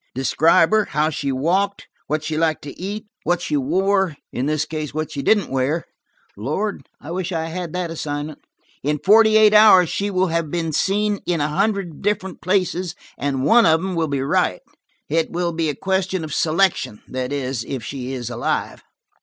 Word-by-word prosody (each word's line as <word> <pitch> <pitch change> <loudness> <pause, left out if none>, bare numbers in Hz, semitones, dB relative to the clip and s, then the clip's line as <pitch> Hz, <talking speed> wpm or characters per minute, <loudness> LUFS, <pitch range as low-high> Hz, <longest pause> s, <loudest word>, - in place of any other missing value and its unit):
Describe 160 +6 +3
her, 215 -1 +3
how 150 +3 0
she 140 -2 -2
walked, 185 +9 0 0.2
what 155 +1 -1
she 155 0 -3
liked 160 -1 0
to 145 - -7
eat, 205 +4 -6 0.2
what 175 0 +1
she 160 - -2
wore–in 170 -2 0
this 155 -1 0
case 155 -2 -5
what 155 0 -3
she 140 - -4
didn't 200 +2 +2
wear. 135 +5 0 0.5
Lord, 150 - -3
I 155 - -9
wish 185 +1 -3
I 165 -2 -1
had 175 -1 -5
that 180 -2 -2
assignment! 150 -1 -4 0.4
In 150 +2 0
forty 220 +6 +5
eight 215 -1 +6
hours 205 -5 +7
she 200 +1 -1
will 185 -1 +1
have 165 -2 -1
been 165 0 -2
seen 205 +5 +1
in 175 -2 +1
a 145 +1 0
hundred 195 -1 -1
different 190 -3 -2
places, 185 -2 0 0.2
and 135 -2 -2
one 230 +7 +6
of 160 0 +4
them 190 +2 -3
will 165 -2 0
be 140 -2 -1
right. 135 - +1 0.5
It 165 +2 0
will 175 0 -1
be 160 -1 0
a 145 - -2
question 190 0 -1
of 155 -2 -6
selection–that 155 - 0
is, 130 -4 -2
if 130 -4 -5
she 130 +1 -5
is 125 -3 -5
alive." - - -2
165 Hz, 185 wpm, -21 LUFS, 145-190 Hz, 0.5 s, hours